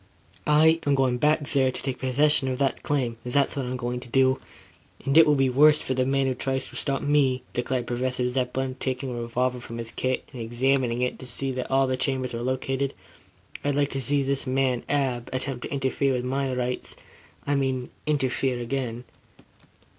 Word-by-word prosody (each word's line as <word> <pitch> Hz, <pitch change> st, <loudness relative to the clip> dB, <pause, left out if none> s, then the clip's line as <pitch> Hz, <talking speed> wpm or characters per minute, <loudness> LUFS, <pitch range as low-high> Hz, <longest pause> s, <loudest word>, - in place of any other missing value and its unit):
"I 160 Hz, +2 st, +5 dB
am 140 Hz, -, +4 dB
going 130 Hz, -2 st, +1 dB
back 150 Hz, 0 st, +2 dB
there 135 Hz, -3 st, +3 dB
to -, -, -5 dB
take 130 Hz, -1 st, -3 dB
possession 135 Hz, +2 st, +3 dB
of 130 Hz, -1 st, -1 dB
that 135 Hz, 0 st, 0 dB
claim. 125 Hz, -5 st, -1 dB
That's 135 Hz, +3 st, +1 dB
what 135 Hz, -3 st, -2 dB
I -, -, -3 dB
am 130 Hz, -, -3 dB
going 125 Hz, 0 st, -3 dB
to 125 Hz, -, -11 dB
do. 130 Hz, +1 st, +3 dB, 0.7 s
And 135 Hz, -, +1 dB
it 160 Hz, 0 st, +8 dB
will 150 Hz, -, +5 dB
be 135 Hz, -1 st, +3 dB
worse 150 Hz, +4 st, +5 dB
for 130 Hz, -, -2 dB
the 130 Hz, 0 st, +1 dB
man 135 Hz, 0 st, +2 dB
who 130 Hz, -, +1 dB
tries 135 Hz, +1 st, -2 dB
to -, -, -14 dB
stop 135 Hz, -1 st, -1 dB
me," 140 Hz, -3 st, +2 dB
declared 125 Hz, 0 st, -1 dB
Professor 125 Hz, +1 st, -1 dB
Zepplin, 130 Hz, +1 st, -2 dB
taking 130 Hz, 0 st, -2 dB
a 120 Hz, -1 st, -4 dB
revolver 125 Hz, +2 st, -1 dB
from 115 Hz, -1 st, -8 dB
his 115 Hz, -1 st, -4 dB
kit, 130 Hz, 0 st, -2 dB
and 125 Hz, -, -6 dB
examining 125 Hz, +1 st, +1 dB
it 125 Hz, -, -2 dB
to 130 Hz, -, -8 dB
see 135 Hz, +2 st, -3 dB
that 130 Hz, 0 st, -4 dB
all 135 Hz, 0 st, +3 dB
the 130 Hz, 0 st, -1 dB
chambers 130 Hz, -1 st, -1 dB
were 115 Hz, -, -3 dB
loaded. 130 Hz, +2 st, -1 dB, 0.7 s
"I'd 145 Hz, -1 st, 0 dB
like 145 Hz, 0 st, +1 dB
to 135 Hz, -, -2 dB
see 140 Hz, +3 st, +1 dB
this 135 Hz, 0 st, -1 dB
man, 130 Hz, -1 st, +1 dB
Ab, 130 Hz, -4 st, 0 dB
attempt 130 Hz, -1 st, -3 dB
to -, -, -7 dB
interfere 135 Hz, 0 st, 0 dB
with 125 Hz, -1 st, -2 dB
my 135 Hz, +1 st, -1 dB
rights 125 Hz, 0 st, -3 dB, 0.5 s
I 145 Hz, -, 0 dB
mean, 130 Hz, -2 st, -1 dB, 0.2 s
interfere 135 Hz, -3 st, +1 dB
again." 120 Hz, -1 st, -3 dB
130 Hz, 205 wpm, -26 LUFS, 125-135 Hz, 0.7 s, it